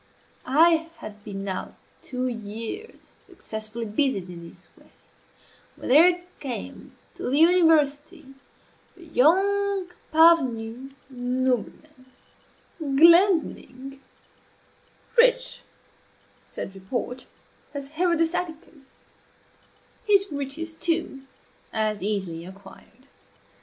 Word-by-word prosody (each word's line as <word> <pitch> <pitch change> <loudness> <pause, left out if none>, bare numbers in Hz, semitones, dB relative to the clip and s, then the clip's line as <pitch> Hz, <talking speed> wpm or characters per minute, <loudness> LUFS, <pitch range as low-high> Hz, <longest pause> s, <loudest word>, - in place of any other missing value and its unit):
I 325 +4 +4
had 210 -1 -11
been 195 -2 -6
now 190 -2 -5 0.3
two 255 0 -3
years 230 - -6
successfully 220 +1 -7
busied 210 -5 -1
in 170 -1 -10
this - - -19
way, - - -22 0.9
when - - -8
there 345 +6 +5 0.2
came 260 -5 -7 0.2
to - - -5
the 275 - +1
university 315 -4 +3 0.7
a - - -16
young 385 +5 +2 0.2
parvenu 270 -6 +3
nobleman, 255 +2 -3 0.7
Glendinning 310 -3 +3 1.2
rich, - - +3 0.9
said 195 - -6
report, 245 +6 -5 0.5
as 280 -1 -5
Herodes 330 +1 +1
Atticus 320 -5 -7 1.0
his 400 -4 +2
riches, 285 +4 -5
too, 320 -5 -2 0.4
as 215 -1 -1
easily 190 -5 -3
acquired. 200 +6 -15
275 Hz, 85 wpm, -25 LUFS, 225-330 Hz, 1.2 s, there